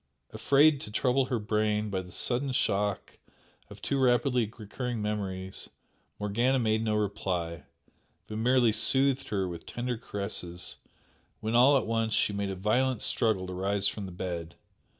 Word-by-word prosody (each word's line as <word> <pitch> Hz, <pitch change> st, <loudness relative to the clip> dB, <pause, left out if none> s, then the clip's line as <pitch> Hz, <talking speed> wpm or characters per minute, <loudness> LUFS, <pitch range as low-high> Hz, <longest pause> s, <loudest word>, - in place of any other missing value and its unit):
Afraid 145 Hz, +1 st, +4 dB
to -, -, -7 dB
trouble 130 Hz, +4 st, +2 dB
her 125 Hz, -1 st, -1 dB
brain 105 Hz, -1 st, 0 dB
by 95 Hz, -1 st, -1 dB
the 90 Hz, -1 st, -12 dB
sudden 130 Hz, +7 st, 0 dB
shock 100 Hz, -4 st, -1 dB, 0.5 s
of -, -, -13 dB
too 140 Hz, -, 0 dB
rapidly 120 Hz, -3 st, +2 dB
recurring 120 Hz, +2 st, -4 dB
memories, 95 Hz, -3 st, -4 dB, 0.5 s
Morgana 120 Hz, +6 st, +1 dB
made 110 Hz, -2 st, +1 dB
no 110 Hz, -1 st, 0 dB
reply, 90 Hz, -5 st, -2 dB, 0.6 s
but 110 Hz, 0 st, -6 dB
merely 120 Hz, 0 st, +4 dB
soothed 135 Hz, +4 st, +3 dB
her 95 Hz, -3 st, -1 dB
with 85 Hz, -2 st, -8 dB
tender 120 Hz, -1 st, -3 dB
caresses, 100 Hz, -5 st, -3 dB, 0.6 s
when 110 Hz, +1 st, -3 dB
all 130 Hz, +4 st, +6 dB
at -, -, -1 dB
once 115 Hz, -1 st, 0 dB
she 105 Hz, -, +2 dB
made 100 Hz, -1 st, -2 dB
a 95 Hz, -, -3 dB
violent 120 Hz, +5 st, +1 dB
struggle 110 Hz, -5 st, +1 dB
to 90 Hz, -, -6 dB
rise 100 Hz, +2 st, 0 dB
from 100 Hz, -2 st, -4 dB
the -, -, -8 dB
bed. 85 Hz, -2 st, -5 dB
110 Hz, 155 wpm, -29 LUFS, 100-125 Hz, 0.6 s, all